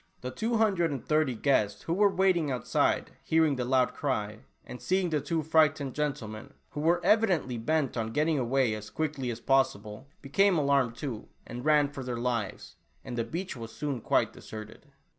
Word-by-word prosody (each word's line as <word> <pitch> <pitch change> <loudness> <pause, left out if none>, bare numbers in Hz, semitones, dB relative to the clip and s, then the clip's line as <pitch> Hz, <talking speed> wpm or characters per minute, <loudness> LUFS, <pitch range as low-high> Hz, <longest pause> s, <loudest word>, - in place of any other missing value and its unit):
The 125 - -5
two 225 - -1
hundred 195 -7 +2
and 140 -4 -5
thirty 155 -5 +2
guests 110 -5 +1
who 165 - -1
were 205 +3 +4
waiting 185 -5 +2
outside, 125 -3 0
hearing 160 -3 +3
the 125 - -2
loud 130 0 +2
cry, 110 -7 -2 0.3
and 125 - -9
seeing 185 -2 0
the 150 -2 +1
two 165 +1 -1
frightened 155 -3 +2
gentlemen, 135 -4 -4 0.2
who 145 - -6
were 170 +3 +2
evi 210 +5 +4
dently 130 - -1
bent 155 0 0
on 115 -2 -2
getting 150 +3 +1
away 130 -1 +1
as 105 0 -7
quickly 145 -4 -3
as 115 -1 -4
possible, 130 -3 0 0.2
became 185 +7 +3
alarmed 140 -5 +2
too, 120 -6 -6 0.2
and 120 +3 -7
ran 150 -2 +4
for 140 -1 -8
their 125 -1 -4
lives, 120 -4 -3 0.3
and 120 - -5
the 115 - 0
beach 180 +5 -5
was 115 -2 -8
soon 140 -1 -4
quite - - +1
deserted. 110 +6 -10
140 Hz, 185 wpm, -29 LUFS, 120-160 Hz, 0.3 s, were